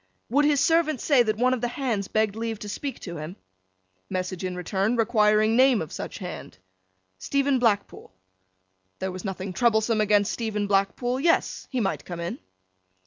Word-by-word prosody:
Would 290 Hz, +4 st, +4 dB
his 295 Hz, -1 st, +3 dB
servant 325 Hz, -3 st, +2 dB
say 280 Hz, -1 st, +4 dB
that 215 Hz, -2 st, 0 dB
one 255 Hz, +2 st, +3 dB
of 250 Hz, -, -2 dB
the 240 Hz, -, 0 dB
Hands 240 Hz, -6 st, -2 dB
begged 215 Hz, -2 st, 0 dB
leave 225 Hz, 0 st, -3 dB
to 210 Hz, -, -8 dB
speak 275 Hz, +6 st, -5 dB
to 170 Hz, -3 st, -6 dB
him? 155 Hz, +4 st, -7 dB, 0.7 s
Message 185 Hz, 0 st, -3 dB
in 185 Hz, -1 st, -3 dB
return, 195 Hz, +5 st, -1 dB
requiring 215 Hz, -1 st, +3 dB
name 255 Hz, -2 st, +5 dB
of 160 Hz, -, -5 dB
such -, -, -6 dB
Hand. -, -, -8 dB, 0.6 s
Stephen 280 Hz, -, +1 dB
Blackpool. 210 Hz, -, 0 dB, 0.9 s
There 190 Hz, 0 st, -3 dB
was 185 Hz, 0 st, -7 dB
nothing 190 Hz, -1 st, -4 dB
troublesome 220 Hz, 0 st, +2 dB
against 205 Hz, -1 st, +3 dB
Stephen 215 Hz, -3 st, -2 dB
Blackpool; 205 Hz, +6 st, 0 dB
yes, 330 Hz, +4 st, +1 dB
he 260 Hz, -, -2 dB
might 200 Hz, -4 st, -1 dB
come 175 Hz, -2 st, -7 dB
in. 170 Hz, +1 st, -4 dB
220 Hz, 170 wpm, -25 LUFS, 195-250 Hz, 0.9 s, name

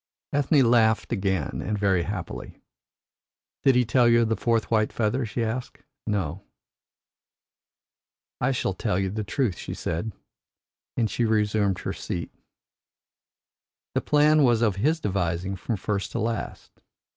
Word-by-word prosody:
Ethne 145 Hz, -1 st, +4 dB
laughed 110 Hz, -1 st, +3 dB
again, 95 Hz, -7 st, -1 dB
and 105 Hz, +2 st, -2 dB
very 100 Hz, -3 st, +2 dB
happily. 95 Hz, -1 st, -6 dB, 1.0 s
"Did 135 Hz, -2 st, +4 dB
he 125 Hz, 0 st, +4 dB
tell 120 Hz, +2 st, +4 dB
you 115 Hz, 0 st, +5 dB
of 115 Hz, -, -1 dB
a -, -, +3 dB
fourth 115 Hz, +2 st, 0 dB
white 110 Hz, -1 st, +2 dB
feather?" 120 Hz, +2 st, 0 dB
she 115 Hz, +2 st, -2 dB
asked. 115 Hz, +3 st, -4 dB, 0.2 s
"No." 95 Hz, -4 st, -1 dB, 2.0 s
"I 125 Hz, +2 st, +1 dB
shall 120 Hz, -6 st, -1 dB
tell 90 Hz, -, -1 dB
you 95 Hz, -1 st, 0 dB
the 105 Hz, +1 st, -3 dB
truth," 110 Hz, -1 st, -1 dB
she -, -, -5 dB
said, 85 Hz, +8 st, -3 dB, 0.9 s
as 115 Hz, -3 st, +1 dB
she 120 Hz, -, 0 dB
resumed 105 Hz, -3 st, +2 dB
her -, -, -3 dB
seat. 85 Hz, -, -5 dB, 1.6 s
"The -, -, +1 dB
plan 150 Hz, +1 st, +4 dB
was 120 Hz, -4 st, +4 dB
of 105 Hz, -4 st, +2 dB
his 155 Hz, +10 st, +2 dB
devising 95 Hz, -, -1 dB
from 105 Hz, +4 st, -3 dB
first 100 Hz, +1 st, -2 dB
to -, -, -1 dB
last. 115 Hz, +1 st, -4 dB
110 Hz, 145 wpm, -25 LUFS, 95-120 Hz, 2.0 s, you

